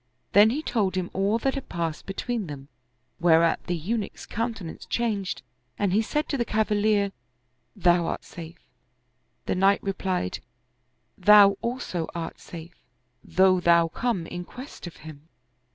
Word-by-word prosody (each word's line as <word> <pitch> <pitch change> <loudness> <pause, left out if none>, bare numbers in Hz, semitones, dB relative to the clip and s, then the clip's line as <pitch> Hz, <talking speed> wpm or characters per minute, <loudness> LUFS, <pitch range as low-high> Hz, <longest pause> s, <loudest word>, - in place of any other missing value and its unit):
Then 205 +2 +7
he 290 +7 -2
told 200 -9 0
him 185 -1 -2
all 200 +3 +1
that 270 +3 0
had 275 - -6
passed 165 -2 -3
between 215 +1 -3
them, 140 -2 -9 0.5
whereat 165 -1 +4
the 175 - 0
Eunuch's 205 +6 -3
countenance 225 -7 -4
changed 210 -5 -2 0.3
and 200 -3 +1
he 215 - +4
said 300 +7 -1
to 280 - 0
the 240 - +1
cavalier 210 -2 +1 0.4
" 125 - -47
Thou 175 -1 +5
art - - -3
safe! 170 0 -10 0.5
" - - -46
The - - 0
knight 195 +2 +3
replied, 190 - -2 0.4
" - - -46
Thou 205 -1 +9
also 235 -9 -3
art 165 -1 -5
safe 170 0 -11 0.4
though 185 0 +4
thou 170 -1 +4
come 220 -2 -1
in 175 +1 -6
quest 255 0 -10
of 170 - -10
him." 155 0 -11
190 Hz, 155 wpm, -26 LUFS, 170-220 Hz, 0.5 s, Thou